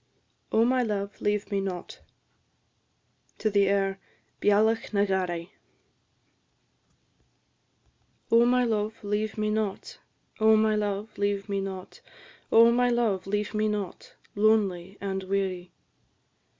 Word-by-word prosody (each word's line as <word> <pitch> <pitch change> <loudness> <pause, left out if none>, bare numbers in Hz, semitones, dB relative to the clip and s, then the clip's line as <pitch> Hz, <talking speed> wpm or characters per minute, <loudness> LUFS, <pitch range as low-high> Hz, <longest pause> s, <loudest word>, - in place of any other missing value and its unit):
OH, 225 +1 +4
MY 255 +1 +2
LOVE, 205 -3 -3
LEAVE 205 0 -1
ME 200 -1 0
NOT! 185 -2 -6 1.5
AIR 195 -1 +2 0.4
"Bealach 220 +2 +2
na 200 0 +3
Gharraidh." 180 -3 -2 2.8
Oh, 230 +1 +6
my 250 0 +3
love, 215 -2 -1
leave 210 +1 -2
me 215 0 0
not! 215 -2 -3 0.4
Oh, 220 0 +6
my 215 0 +3
love, 210 +1 -3
leave 200 0 -1
me 200 -1 -1
not! 190 -1 -7 0.5
Oh, 230 +1 +7
my 245 +1 +2
love, 220 -6 0
leave 205 +2 -2
me 215 0 +1
not! 205 -3 -5 0.2
Lonely 200 -3 +1
and 190 -1 -3
weary. 185 -2 -2
205 Hz, 110 wpm, -27 LUFS, 195-220 Hz, 2.8 s, Oh